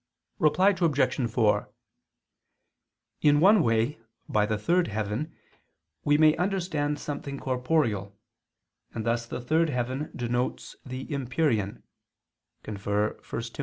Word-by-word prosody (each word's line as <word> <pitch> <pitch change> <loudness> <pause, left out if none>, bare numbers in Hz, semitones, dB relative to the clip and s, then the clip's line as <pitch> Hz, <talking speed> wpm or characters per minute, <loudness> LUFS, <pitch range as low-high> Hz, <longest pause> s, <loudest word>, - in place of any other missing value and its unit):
Reply 185 +4 +4
Obj. 140 -5 +2
4: 110 -3 +2 1.5
In 145 -1 +5
one 200 +4 +6
way 115 +3 +1 0.3
by 105 -1 +2
the 110 -1 0
third 170 - +2
heaven 110 +8 -3 0.7
we 145 0 +3
may 155 0 +5
understand 170 -6 -1
something 140 -1 -5
corporeal, 125 -7 0 0.8
and 110 - -3
thus 115 0 0
the - - -5
third 160 +6 +2
heaven 130 +3 -2
denotes 120 0 -2
the 130 0 -6
empyrean 130 -6 -1 0.8
[*1 105 - -5 0.8
Tim. - - -14
135 Hz, 110 wpm, -27 LUFS, 115-155 Hz, 1.5 s, one